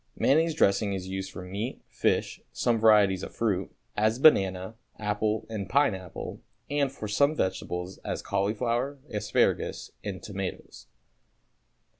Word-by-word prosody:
Mayonnaise 160 +3 +3
dressing 100 -5 +3
is 95 -1 -4
used 95 0 -4
for 95 - -8
meat, 100 +7 -5
fish, - - 0
some 115 -2 +1
varieties 105 -4 +5
of - - -7
fruit, 100 -5 0 0.2
as 110 +2 +2
banana, 95 -8 +4 0.2
apple 105 +1 -1
and 105 -4 -5
pineapple, 95 - 0 0.3
and 145 -2 +1
for 110 -6 -6
some 140 +9 +3
vegetables, 95 -3 -2
as - - -4
cauliflower, 115 +7 0
asparagus 105 -2 0
and 95 -3 -5
tomatoes. 100 -2 -6
105 Hz, 125 wpm, -28 LUFS, 95-115 Hz, 0.3 s, varieties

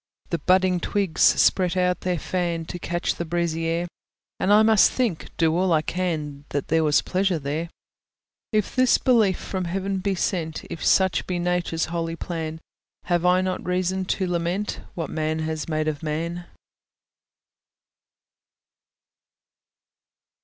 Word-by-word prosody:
The 170 - 0
budding 185 +2 +3
twigs 195 -1 -1
spread 185 -1 +4
out 180 -1 +2
their 180 -1 -1
fan, 170 -1 -2
To 175 - -6
catch 175 0 -1
the - - -4
breezy 165 -1 -1
air; 170 +1 -1 0.5
And 195 - +1
I 210 +1 +7
must 220 -2 +5
think, 230 -11 -1
do 160 -1 +2
all 185 +1 +2
I 155 -1 +3
can, 155 -6 -3
That 145 -1 -3
there 160 0 +3
was 150 -1 +3
pleasure 190 -1 0
there. 155 +3 -3 0.8
If 215 -3 0
this 255 -1 +4
belief 220 -7 +3
from 185 -2 -4
heaven 195 +2 -2
be 195 +1 -1
sent, 165 -3 -2
If 165 - -6
such 190 -1 +3
be 180 - -1
Nature's 175 -2 0
holy 165 -1 -2
plan, 160 -2 -5 0.4
Have 175 0 +1
I 180 +1 +4
not 185 0 -2
reason 185 +1 -1
to 190 +1 -1
lament 175 +3 -2
What 165 -4 -4
man 155 0 -1
has 155 0 -4
made 155 0 -1
of 155 0 -2
man? 170 +3 -3
175 Hz, 145 wpm, -24 LUFS, 160-185 Hz, 0.8 s, I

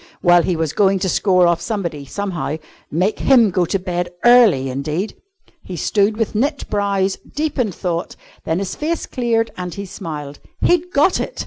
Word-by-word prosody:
Well, 175 -1 +6
he 175 +1 0
was 160 -2 -2
going 195 -1 +3
to 190 0 -1
score 185 -1 +3
off 170 -1 +2
somebody, 170 -9 -3
somehow. 175 -2 -3 0.3
Make 180 +7 0
him 235 -6 +5
go 180 0 +1
to 195 - 0
bed 175 -1 -3 0.2
early 230 - +6
indeed! 150 +10 -3 0.5
He 185 - -8
stood 205 +5 +1
with 225 -2 -1
knit 280 +7 -1
brows, 200 -2 0
deep 300 -2 -4
in 225 -5 +1
thought, 175 -2 -3 0.3
then 160 - -1
his 195 0 -3
face 325 +2 -2
cleared 230 -3 0
and 180 -2 -5
he 200 - -5
smiled. 150 -6 -7 0.2
He'd 355 +1 +2
got 300 +5 +3
it! - - -5
190 Hz, 180 wpm, -19 LUFS, 170-225 Hz, 0.5 s, Well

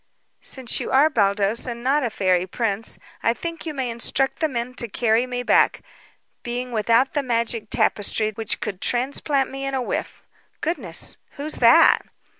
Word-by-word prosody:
"Since 260 -3 +1
you - - -4
are 290 +4 +4
Baldos, 205 0 +1
and 235 -1 -5
not 280 +4 +2
a 245 - 0
fairy 185 -3 +1
prince, 220 +1 -2 0.2
I 230 - +2
think 335 +2 -6
you 310 - -3
may 260 -3 -2
instruct 260 +3 -1
the 315 - +2
men 245 -1 -3
to 235 - 0
carry 230 +2 +1
me 245 0 -3
back, - - +3 0.6
being 245 +1 -4
without 230 +4 +2
the 290 - +1
magic 230 -3 -1
tapestry 215 -1 +1
which 220 0 -3
could 200 -5 -4
transplant 270 +2 0
me 270 0 -6
in 275 0 -2
a 260 - 0
whiff. - - -4 0.4
Goodness, 260 - -3 0.2
who's 295 +2 -3
that?" - - +7
240 Hz, 170 wpm, -23 LUFS, 220-270 Hz, 0.6 s, that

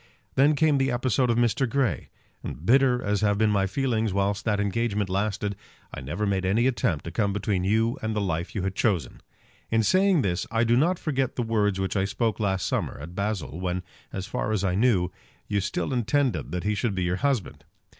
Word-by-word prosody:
Then 145 +3 +4
came 150 -2 +3
the 135 0 +2
episode 125 0 +1
of 115 - +2
Mr. 120 +2 +2
Grey; 125 - 0 0.3
and 75 - -7
bitter 125 +1 +4
as 105 0 0
have 105 -1 +2
been 110 0 +3
my 100 -1 +2
feelings 110 0 0
whilst 100 +1 0
that 105 -3 +1
engagement 105 -1 -1
lasted, 100 +1 -1 0.4
I - - -6
never 85 +11 -3
made 95 -2 0
any 105 +6 +2
attempt 100 - 0
to 85 - -5
come 100 -1 0
between 100 -2 -1
you 110 +4 +1
and 110 0 -2
the - - +1
life 85 -3 -2
you 100 - -1
had 95 -1 -1
chosen. 95 - -1 0.5
In 115 0 +2
saying 185 - +3
this 90 -2 -1
I 115 0 +1
do 120 0 +3
not 170 +8 +3
forget 135 -6 -1
the 120 - -1
words 105 -4 +1
which 95 +1 -2
I 95 -1 +2
spoke 110 +3 -1
last 95 -3 0
summer - - -2
at 80 +4 -8
Basle, 95 -6 -3
when, 90 0 -2 0.3
as 95 - -4
far 110 - -2
as 105 -3 0
I 95 -2 +1
knew, 95 -4 +2 0.4
you 100 -1 0
still 105 +7 -2
intended 115 - 0
that 90 0 -3
he 105 - +1
should 105 -1 -1
be 95 - -1
your 90 +1 0
husband. 135 -4 -1
105 Hz, 215 wpm, -26 LUFS, 95-120 Hz, 0.5 s, Then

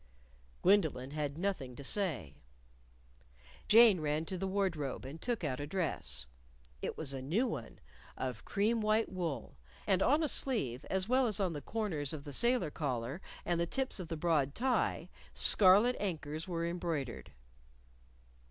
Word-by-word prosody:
Gwendolyn 160 -9 +2
had 150 -1 -3
nothing 165 -9 -3
to 140 - -9
say. 150 - -1 1.3
Jane 220 -4 +7
ran 150 +1 -1
to 185 - -4
the 190 +1 -3
wardrobe 180 -10 -2
and 145 +5 -8
took 240 -6 -2
out 130 -4 -2
a 145 - -4
dress. 145 - -2 0.6
It - - -4
was 140 -3 -3
a 135 - -5
new 175 - +1
one, - - -6 0.4
of - - -4
cream 220 +3 0
white 215 +1 +1
wool; 160 - -4 0.3
and 190 -1 +2
on 295 +8 +3
a - - +2
sleeve, 155 - +3
as 190 0 0
well 255 +1 +3
as 210 -2 0
on 185 -4 0
the 145 - -5
corners 165 - -2
of 150 -2 -6
the 145 -1 -8
sailor 235 - +2
collar 135 +2 -3 0.2
and 170 -1 0
the 170 - 0
tips 265 -1 -2
of 180 - -6
the 165 - -4
broad 150 -4 +1
tie, 255 +1 0 0.3
scarlet 210 +5 +6
anchors 160 -4 -3
were 170 -2 -2
embroidered. 165 -7 -4
170 Hz, 160 wpm, -33 LUFS, 145-205 Hz, 1.3 s, Jane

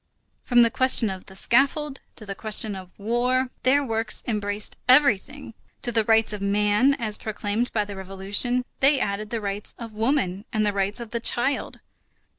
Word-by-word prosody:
From 240 -1 +4
the 230 - +2
question 255 -5 +4
of 185 -1 -9
the 190 - -14
scaffold 275 +6 +1 0.2
to 215 - -11
the 200 - -5
question 215 0 +1
of 185 -1 -11
war, 250 +4 0
their 280 +3 +3
works 225 -3 -1
embraced 205 -2 -2
everything. 260 -1 +3 0.3
To 240 - 0
the 225 -1 +1
rights 225 0 +2
of 210 - -6
man, 210 +6 +2
as 215 -4 0
proclaimed 215 +2 -3
by 210 -2 0
the 205 - -8
French - - -10
Revolution, 205 +6 0
they 275 +1 +4
added 205 -1 -3
the 230 - -3
rights 200 0 -5
of 230 -2 -9
woman 215 -4 -1
and 215 -2 0
the 205 - 0
rights 200 +2 -1
of 235 -2 -8
the 235 - -2
child. 240 +4 0
220 Hz, 185 wpm, -24 LUFS, 205-250 Hz, 0.3 s, From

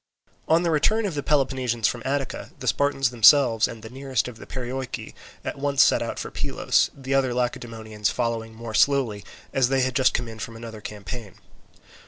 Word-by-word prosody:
On 165 +2 +4
the 170 - +1
return 215 +9 +2
of 195 - -2
the 145 - -2
Peloponnesians 130 -5 +1
from 120 - -3
Attica, 135 0 -2
the - - -7
Spartans 140 -3 +2
themselves 120 -1 +6
and 115 -2 -9
the 110 - -8
nearest 135 -2 -1
of 120 -3 -8
the - - -12
Perioeci 130 0 -5 0.3
at - - -4
once 140 -1 +4
set - - +3
out - - -3
for - - -5
Pylos, - - +1
the 135 0 -3
other 130 -2 +2
Lacedaemonians 115 -4 -2
following 115 -2 -2
more 115 -1 -7
slowly, 120 -6 +2 0.3
as 130 -2 +3
they 135 -1 +2
had 130 0 0
just 130 -2 +3
come 125 - -1
in 110 -1 -9
from 115 +1 -6
another 115 -1 -9
campaign. 105 0 -7
125 Hz, 190 wpm, -25 LUFS, 115-135 Hz, 0.3 s, themselves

